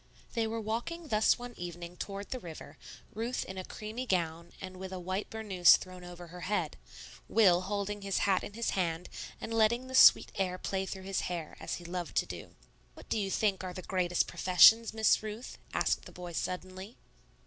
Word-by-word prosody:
They 230 Hz, -2 st, 0 dB
were 225 Hz, +1 st, -3 dB
walking 240 Hz, +10 st, -4 dB
thus 215 Hz, -1 st, +4 dB
one 245 Hz, 0 st, -8 dB
evening 175 Hz, 0 st, -7 dB
toward 200 Hz, +2 st, -6 dB
the 255 Hz, -, -2 dB
river, 165 Hz, -7 st, -10 dB, 0.4 s
Ruth 230 Hz, +4 st, -2 dB
in 190 Hz, 0 st, -7 dB
a -, -, -4 dB
creamy 220 Hz, +6 st, -6 dB
gown 170 Hz, -3 st, -1 dB
and 185 Hz, -1 st, -8 dB
with 190 Hz, 0 st, -7 dB
a 185 Hz, -, -5 dB
white 185 Hz, +3 st, -3 dB
burnous 200 Hz, -6 st, +5 dB
thrown 185 Hz, -1 st, -10 dB
over 175 Hz, 0 st, -9 dB
her 180 Hz, +2 st, -10 dB
head, 205 Hz, +3 st, -1 dB, 0.5 s
Will 185 Hz, -6 st, +5 dB
holding 205 Hz, +1 st, -3 dB
his 195 Hz, -1 st, -1 dB
hat 195 Hz, -2 st, +2 dB
in -, -, -7 dB
his 230 Hz, +1 st, -1 dB
hand 175 Hz, -2 st, -1 dB, 0.3 s
and 225 Hz, -, -5 dB
letting 225 Hz, +3 st, +3 dB
the 260 Hz, -, -9 dB
sweet 260 Hz, -, +7 dB
air 185 Hz, -2 st, -1 dB
play 190 Hz, 0 st, -2 dB
through 190 Hz, 0 st, -6 dB
his 195 Hz, 0 st, -1 dB
hair, 170 Hz, -3 st, -5 dB
as -, -, -3 dB
he 175 Hz, -, -10 dB
loved 175 Hz, 0 st, -5 dB
to -, -, +3 dB
do. -, -, -9 dB, 0.4 s
"What -, -, -14 dB
do -, -, +1 dB
you 195 Hz, -2 st, -1 dB
think 195 Hz, -1 st, +1 dB
are 185 Hz, -1 st, -5 dB
the 185 Hz, -, -6 dB
greatest 180 Hz, -2 st, +1 dB
professions, 220 Hz, +5 st, +6 dB
Miss 220 Hz, 0 st, +3 dB
Ruth?" 215 Hz, +3 st, -7 dB
asked -, -, 0 dB
the -, -, -10 dB
boy 175 Hz, -1 st, -8 dB
suddenly. 185 Hz, +5 st, -5 dB
190 Hz, 200 wpm, -31 LUFS, 180-220 Hz, 0.5 s, sweet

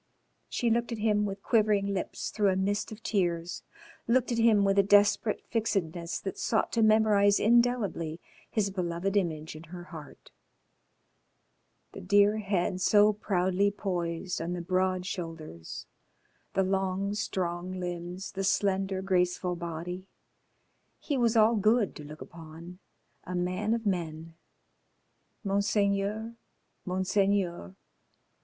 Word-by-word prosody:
She 235 Hz, -2 st, 0 dB
looked 235 Hz, +1 st, 0 dB
at 230 Hz, -, -3 dB
him 210 Hz, -1 st, +1 dB
with 195 Hz, 0 st, -6 dB
quivering 210 Hz, -3 st, +2 dB
lips 200 Hz, -2 st, -3 dB
through 205 Hz, -2 st, +2 dB
a 190 Hz, -, +1 dB
mist 200 Hz, +4 st, -1 dB
of 215 Hz, +1 st, -10 dB
tears, 175 Hz, -4 st, -1 dB, 0.5 s
looked 250 Hz, +1 st, +2 dB
at 235 Hz, -, 0 dB
him 225 Hz, -3 st, +5 dB
with 195 Hz, 0 st, +3 dB
a -, -, +9 dB
desperate 205 Hz, +2 st, +3 dB
fixedness 180 Hz, -7 st, -1 dB
that 195 Hz, -, -5 dB
sought 220 Hz, -, 0 dB
to 230 Hz, -, +1 dB
memorise 215 Hz, -2 st, +4 dB
indelibly 220 Hz, -8 st, +2 dB, 0.3 s
his 200 Hz, -3 st, 0 dB
beloved 180 Hz, +1 st, -2 dB
image 160 Hz, -5 st, -1 dB
in 155 Hz, +2 st, -10 dB
her 175 Hz, +2 st, -9 dB
heart. -, -, -12 dB, 1.6 s
The -, -, -9 dB
dear 205 Hz, +1 st, +4 dB
head 185 Hz, -3 st, -1 dB
so 210 Hz, +2 st, +5 dB
proudly 190 Hz, -1 st, +1 dB
poised 180 Hz, -3 st, -3 dB
on 170 Hz, +2 st, -3 dB
the 175 Hz, -, -4 dB
broad 185 Hz, 0 st, 0 dB
shoulders, 165 Hz, -, -6 dB, 0.7 s
the 195 Hz, -, +3 dB
long 190 Hz, +1 st, -1 dB
strong 180 Hz, -3 st, -3 dB
limbs, 175 Hz, +1 st, -5 dB
the 195 Hz, 0 st, -4 dB
slender, 195 Hz, 0 st, 0 dB
graceful 180 Hz, -1 st, 0 dB
body. 170 Hz, +2 st, -6 dB, 0.9 s
He 290 Hz, -, -3 dB
was 235 Hz, -3 st, +2 dB
all 220 Hz, +1 st, +5 dB
good 215 Hz, 0 st, +2 dB
to 150 Hz, -, -9 dB
look 150 Hz, +1 st, -11 dB
upon. 170 Hz, +2 st, -11 dB, 0.5 s
A 180 Hz, -, -5 dB
man 185 Hz, +5 st, 0 dB
of 230 Hz, -1 st, -5 dB
men. 165 Hz, -4 st, -3 dB, 1.1 s
Monseigneur! 200 Hz, +2 st, 0 dB, 0.5 s
Monseigneur! 190 Hz, -, 0 dB
195 Hz, 130 wpm, -29 LUFS, 175-210 Hz, 1.6 s, a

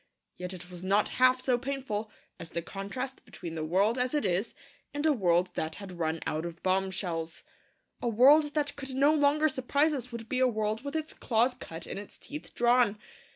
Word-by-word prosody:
Yet 180 Hz, 0 st, -5 dB
it 180 Hz, -1 st, -8 dB
was 180 Hz, 0 st, -8 dB
not 200 Hz, +2 st, +2 dB
half 255 Hz, 0 st, +5 dB
so 250 Hz, -2 st, +2 dB
painful 250 Hz, -5 st, -3 dB, 0.3 s
as 165 Hz, -, -6 dB
the 170 Hz, 0 st, -3 dB
contrast 205 Hz, +9 st, -5 dB
between 170 Hz, -3 st, -8 dB
the 160 Hz, -1 st, -3 dB
world 200 Hz, +9 st, +2 dB
as 250 Hz, +3 st, 0 dB
it 295 Hz, -, +1 dB
is 190 Hz, +4 st, 0 dB, 0.4 s
and 290 Hz, +1 st, -1 dB
a 310 Hz, -, +5 dB
world 180 Hz, -5 st, +2 dB
that 160 Hz, -1 st, -2 dB
had 190 Hz, -4 st, -9 dB
run 160 Hz, 0 st, -1 dB
out 155 Hz, +1 st, -1 dB
of 170 Hz, 0 st, -7 dB
bombshells. 185 Hz, -3 st, -1 dB, 0.6 s
A 245 Hz, -, -1 dB
world 290 Hz, +7 st, +6 dB
that 290 Hz, -1 st, 0 dB
could 270 Hz, -2 st, -5 dB
no 285 Hz, +3 st, +5 dB
longer 300 Hz, +1 st, +4 dB
surprise 285 Hz, +3 st, +1 dB
us 250 Hz, -3 st, -4 dB
would 230 Hz, -1 st, -7 dB
be 255 Hz, -, -1 dB
a 260 Hz, -, +5 dB
world 215 Hz, 0 st, -1 dB
with 285 Hz, +2 st, -5 dB
its 315 Hz, 0 st, -2 dB
claws 235 Hz, +2 st, +2 dB
cut 165 Hz, -9 st, -8 dB
and -, -, -5 dB
its 205 Hz, -, -10 dB
teeth 300 Hz, +1 st, -8 dB
drawn. 240 Hz, -3 st, +4 dB
225 Hz, 200 wpm, -30 LUFS, 180-265 Hz, 0.6 s, world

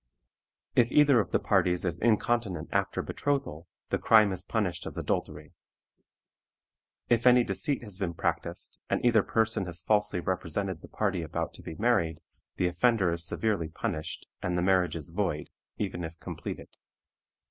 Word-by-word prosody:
If 120 Hz, 0 st, +4 dB
either 145 Hz, -4 st, +6 dB
of 105 Hz, -, -1 dB
the -, -, +2 dB
parties 90 Hz, 0 st, +1 dB
is 85 Hz, -1 st, -2 dB
incontinent 110 Hz, -6 st, +1 dB
after 100 Hz, 0 st, 0 dB
betrothal, 135 Hz, -, -2 dB, 0.2 s
the -, -, +1 dB
crime 110 Hz, -3 st, +5 dB
is 90 Hz, -1 st, -1 dB
punished 105 Hz, -6 st, -2 dB
as -, -, -7 dB
adultery. 75 Hz, -1 st, -3 dB, 1.5 s
If 120 Hz, +1 st, +3 dB
any 125 Hz, 0 st, +7 dB
deceit 140 Hz, +1 st, -1 dB
has 105 Hz, -3 st, -5 dB
been 85 Hz, -4 st, -2 dB
practiced, -, -, -3 dB
and -, -, 0 dB
either 115 Hz, -3 st, +5 dB
person 110 Hz, -3 st, 0 dB
has 85 Hz, -1 st, -1 dB
falsely 105 Hz, -3 st, +2 dB
represented 95 Hz, 0 st, -2 dB
the -, -, -11 dB
party 100 Hz, -4 st, -1 dB
about 80 Hz, -, -3 dB
to -, -, -10 dB
be 80 Hz, -, -7 dB
married, 85 Hz, -6 st, +1 dB, 0.4 s
the 90 Hz, -, 0 dB
offender 95 Hz, +1 st, +2 dB
is 85 Hz, 0 st, 0 dB
severely 100 Hz, -8 st, 0 dB
punished, 85 Hz, -3 st, -4 dB, 0.2 s
and 90 Hz, 0 st, -1 dB
the 90 Hz, -, +1 dB
marriage 95 Hz, -2 st, +2 dB
is 80 Hz, -1 st, -6 dB
void, 90 Hz, -5 st, -2 dB, 0.3 s
even 90 Hz, -4 st, -3 dB
if 80 Hz, 0 st, -6 dB
completed. -, -, -7 dB
95 Hz, 160 wpm, -29 LUFS, 85-110 Hz, 1.5 s, any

